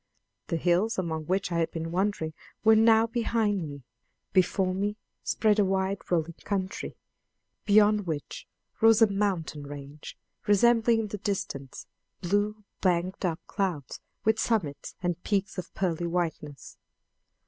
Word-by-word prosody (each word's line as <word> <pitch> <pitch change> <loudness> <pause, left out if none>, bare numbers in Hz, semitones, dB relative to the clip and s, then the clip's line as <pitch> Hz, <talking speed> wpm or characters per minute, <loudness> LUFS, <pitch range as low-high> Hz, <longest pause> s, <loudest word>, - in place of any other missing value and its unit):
The 165 - -1
hills 180 +7 +2
among 160 -4 -2
which 190 0 0
I 170 - +1
had 165 - +1
been 165 0 -5
wandering 180 -3 -1 0.3
were 220 0 +7
now 225 0 +6
behind 220 -7 0
me; 140 -2 -9 0.5
before 185 0 +2
me 205 +2 -1 0.3
spread 215 -1 +2
a - - +6
wide 190 0 0
rolling 170 -1 0
country, 195 -2 -3 0.7
beyond 210 -1 +4
which 155 -3 -5 0.3
rose 225 0 +7
a 215 - +4
mountain 190 -7 -1
range 145 +1 -9 0.3
resembling 230 +2 +4
in 215 - -3
the 210 - -5
distance 140 -9 -4 0.3
blue 205 +3 0 0.2
banked 185 +1 0
up 165 -2 -1
clouds 180 -9 -3 0.3
with 220 0 +3
summits 180 -14 -1
and 175 -1 -1
peaks 195 -2 -1
of 180 - -7
pearly 175 -2 -1
whiteness. 165 -4 -4
190 Hz, 135 wpm, -28 LUFS, 170-210 Hz, 0.7 s, were